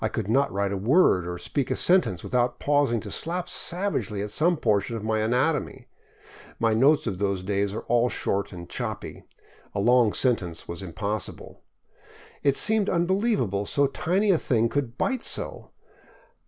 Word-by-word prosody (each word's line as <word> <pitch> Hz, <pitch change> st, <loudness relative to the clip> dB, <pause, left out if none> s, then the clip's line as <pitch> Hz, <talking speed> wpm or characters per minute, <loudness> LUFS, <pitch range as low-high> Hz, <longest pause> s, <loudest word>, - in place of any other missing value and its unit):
I 110 Hz, -, +1 dB
could 110 Hz, -2 st, -4 dB
not 135 Hz, +6 st, +2 dB
write 100 Hz, 0 st, -1 dB
a 100 Hz, -, -2 dB
word 105 Hz, -, +3 dB
or 90 Hz, 0 st, -4 dB
speak 140 Hz, +8 st, -3 dB
a -, -, 0 dB
sentence 175 Hz, -, +2 dB
without 125 Hz, 0 st, 0 dB
pausing 145 Hz, -5 st, +2 dB
to -, -, -8 dB
slap 175 Hz, +2 st, -3 dB
savagely 175 Hz, -, -1 dB
at 105 Hz, -, -5 dB
some 170 Hz, +8 st, +2 dB
portion 110 Hz, -1 st, 0 dB
of 110 Hz, -, -7 dB
my 110 Hz, 0 st, 0 dB
anatomy. 125 Hz, +7 st, 0 dB, 0.7 s
My 115 Hz, -1 st, +1 dB
notes 140 Hz, +7 st, +4 dB
of 95 Hz, -, -3 dB
those 100 Hz, -2 st, -1 dB
days 100 Hz, +1 st, -1 dB
are -, -, -3 dB
all 120 Hz, +1 st, +2 dB
short 100 Hz, -3 st, -2 dB
and 85 Hz, -2 st, -9 dB
choppy. -, -, -6 dB, 0.5 s
A -, -, 0 dB
long 120 Hz, 0 st, +4 dB
sentence 95 Hz, -11 st, -1 dB
was 85 Hz, +3 st, -6 dB
impossible. 100 Hz, +3 st, -5 dB, 0.8 s
It 140 Hz, -1 st, +2 dB
seemed 215 Hz, -2 st, +3 dB
unbelievable 175 Hz, -, 0 dB
so 140 Hz, -, +2 dB
tiny 185 Hz, +9 st, +1 dB
a 170 Hz, -, +2 dB
thing 115 Hz, -2 st, +1 dB
could 120 Hz, -1 st, -3 dB
bite 260 Hz, -3 st, -1 dB
so. -, -, -3 dB
115 Hz, 170 wpm, -25 LUFS, 100-150 Hz, 0.8 s, notes